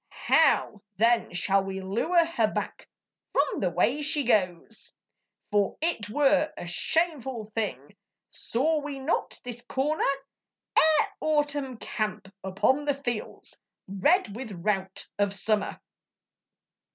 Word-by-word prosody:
How 210 - +3 0.2
then 230 +3 +3
shall 190 +2 +1
we 190 0 -4
lure 240 - +2
her 230 -10 0
back - - -5 0.4
From 280 0 +1
the 185 - +1
way 235 - +1
she 295 0 +2
goes? 205 -3 0 0.6
For 205 -1 +1
it 305 - -1
were 295 +4 +3
a - - -6
shameful 265 - 0
thing, 200 - -3 0.4
Saw 305 +7 0
we 290 -1 -5
not 270 +5 -2
this 245 -2 -5
comer 270 +5 -1 0.7
Ere 310 -2 +5
Autumn 290 -4 0
camp 210 -3 -4
upon 230 +10 +1
the 285 -1 +1
fields 240 -6 -5 0.3
Red 210 - +2
with 240 -2 -6
rout 190 +1 -2
of 200 -1 +1
Summer. 210 0 0
235 Hz, 120 wpm, -27 LUFS, 195-290 Hz, 0.7 s, Ere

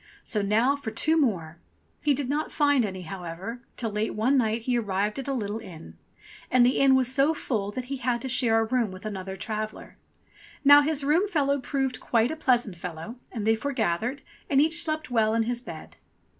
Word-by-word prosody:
"So 210 - -1
now 225 +7 +2
for 280 -5 -5
two 310 +9 +2
more 180 - 0 0.2
!" - - -41
He 290 -2 +2
did 275 -1 -2
not 295 +3 -2
find 285 -5 +3
any, 190 -2 -5
however, 180 +7 -7 0.2
till 225 -3 -2
late 210 +2 -2
one 235 +6 +2
night 225 -3 +1
he 250 +1 0
ar 235 - +1
rived 205 +3 -1
at 270 - -6
a - - -1
little 215 -3 -3
inn. 160 - -11 0.5
And 250 -1 +5
the 250 - +2
inn 270 -1 +5
was 260 -1 +2
so 285 +3 +3
full 210 -9 -2
that 255 +2 -4
he 275 +2 -4
had 245 -1 -1
to - - -3
share 240 -3 +2
a - - +2
room 235 -1 0
with 185 +2 -10
another 190 -2 -5
traveller. 215 +2 -5 0.7
Now 285 +1 +9
his 295 -1 0
room 320 +8 +3
fellow 285 -6 +1
proved 265 -1 -2
quite 230 +2 +1
a - - -3
pleasant 245 - +1
fellow, 175 +7 -7
and 220 -4 -4
they 225 0 +4
foregathered, 235 0 -2 0.3
and 275 - +4
each 320 +3 +3
slept 310 -3 -3
well 220 -2 +2
in 230 - +2
his 240 +1 -2
bed. - - -10
240 Hz, 210 wpm, -26 LUFS, 210-275 Hz, 0.7 s, Now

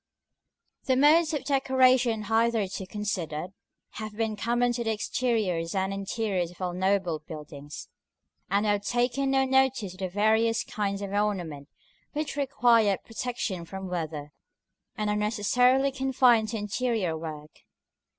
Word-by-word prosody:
§ - - -61 0.8
I. - - -25
The - - +1
modes 315 +3 +5
of 295 - -2
decoration 255 -4 +3
hitherto 225 -4 0
considered, 185 -5 -3 0.5
have 215 -1 -6
been 225 -1 -1
common 240 +3 +1
to 240 0 -2
the 225 - 0
exteriors 210 -7 -1
and 190 0 0
interiors 195 -2 -2
of 175 - -17
all 180 -2 -2
noble 185 -3 0
buildings; 150 -2 -9 0.6
and 200 +3 +2
we 210 - +3
have 205 -1 0
taken 245 +5 0
no 270 0 +3
notice 265 -7 +2
of 185 - -16
the 190 -1 -2
various 220 +4 +2
kinds 200 -1 -3
of 195 - -5
ornament 175 -9 -2 0.4
which 300 -1 -3
require 240 -7 +3
protection 225 -6 -4
from 190 +2 -7
weather, 155 -4 -4 0.7
and 210 - -1
are - - 0
necessarily 245 +6 +2
confined 255 -4 +3
to 225 - -3
interior 210 -4 -1
work. 155 -2 -8
210 Hz, 145 wpm, -27 LUFS, 185-245 Hz, 0.8 s, modes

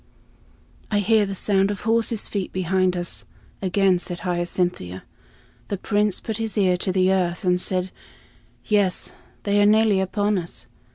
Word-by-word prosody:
"I 210 - +1
hear 210 +1 +3
the 195 - -4
sound 195 0 +2
of 205 -2 -4
horses' 225 0 +1
feet 195 -3 -3
behind 185 0 +1
us," 175 -1 -4 0.4
again 190 -1 +2
said 175 0 -3
Hyacinthia. 175 - -2 0.6
The 200 - -3
Prince 205 0 0
put 220 -3 -4
his 225 -1 -3
ear 185 -3 +3
to 185 - -2
the 185 0 +3
earth 180 0 0
and 180 0 +3
said, 185 0 -1 0.7
"Yes, 205 -4 +1 0.3
they 205 0 +2
are - - +5
nearly 215 -2 +4
upon 205 +1 0
us." 170 -7 -7
190 Hz, 155 wpm, -23 LUFS, 180-205 Hz, 0.7 s, are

